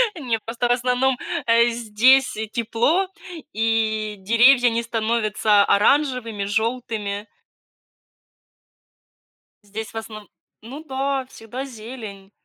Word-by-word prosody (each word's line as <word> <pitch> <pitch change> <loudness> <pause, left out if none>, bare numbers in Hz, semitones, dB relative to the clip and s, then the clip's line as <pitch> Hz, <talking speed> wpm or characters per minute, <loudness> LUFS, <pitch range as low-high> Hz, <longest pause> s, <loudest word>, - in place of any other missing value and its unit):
Не, 245 -9 -2
просто 230 +3 -3
в - - +4
основном, 250 +1 +1 0.3
э, 235 +1 +4
здесь 240 +3 +3 0.2
тепло, 240 - +1 0.5
и 220 -1 0
деревья 245 +5 +5
не 230 +1 -1
становятся 220 -2 +1
оранжевыми, 230 -3 +1
желтыми. 220 -1 -2 2.4
Здесь 210 +2 -7
в - - -18
основно 215 -1 -8 0.4
ну 275 +7 -9
да, 270 -1 -2
всегда 255 +2 -8
зелень. 220 -5 -10
230 Hz, 95 wpm, -22 LUFS, 215-255 Hz, 2.4 s, деревья